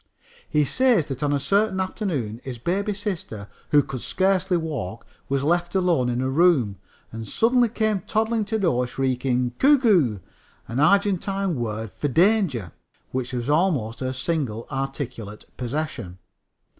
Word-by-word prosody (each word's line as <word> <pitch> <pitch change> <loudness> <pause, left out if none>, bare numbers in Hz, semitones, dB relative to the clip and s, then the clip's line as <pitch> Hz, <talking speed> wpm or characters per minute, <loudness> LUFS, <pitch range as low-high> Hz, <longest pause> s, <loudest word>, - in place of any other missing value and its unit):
He 150 -1 +2
says 240 - +3
that 135 -1 -5
on 145 -1 +1
a 145 - +1
certain 200 +5 +1
afternoon 155 - -3
his 130 -3 -6
baby 195 - -1
sister, 180 - -5 0.2
who 145 -1 +5
could 130 -2 -6
scarcely 190 -1 +1
walk, 135 - -4 0.2
was 135 0 0
left 175 +4 0
alone 175 -9 +2
in 120 +1 -1
a 130 - 0
room, 135 - +3 0.3
and 115 -1 -7
suddenly 240 - +3
came 220 -2 0
toddling 225 0 +1
to 220 - -3
the 220 - 0
door 125 -9 +1
shrieking 125 -1 0
"ku 290 +2 +6
ku," 175 - +3 0.5
an 115 +3 -3
Argentine 195 +2 +2
word 110 -4 -3
for 145 - -2
danger, 160 - +2 0.4
which 130 -1 -3
was 120 -1 -3
almost 145 - +1
her 130 -1 -2
single 130 -5 -2
articulate 130 -6 -5
possession. 125 - -4
150 Hz, 150 wpm, -24 LUFS, 125-195 Hz, 0.5 s, ku